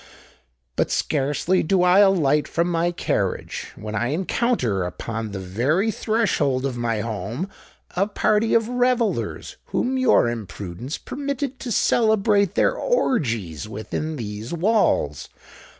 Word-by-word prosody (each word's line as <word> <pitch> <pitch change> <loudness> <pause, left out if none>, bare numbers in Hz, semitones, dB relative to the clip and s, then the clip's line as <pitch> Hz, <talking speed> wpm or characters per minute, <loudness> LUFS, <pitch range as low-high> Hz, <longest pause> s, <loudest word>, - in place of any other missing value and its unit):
But - - +1
scarcely 150 +5 +1
do 180 +2 +2
I 180 +2 +5
alight 160 -8 +4
from 170 +1 0
my 170 +1 +1
carriage, 175 - -2
when 105 0 -7
I 110 +3 0
encounter 155 - 0
upon 110 +5 -4
the 100 - -5
very 130 - 0
threshold 200 - 0
of 135 -3 -2
my 115 -3 -1
home 115 - -4 0.5
a 195 +3 +2
party 215 +1 +2
of 225 -1 +3
revellers 245 -2 0
whom 260 +1 -1
your 245 - +4
imprudence 110 - -5
permitted 280 -1 -4
to 260 -3 -5
celebrate 215 -3 +3
their - - +3
orgies 115 - -1
within 130 +9 -4
these 110 -2 -6
walls. 170 - +1
160 Hz, 125 wpm, -23 LUFS, -, 0.5 s, I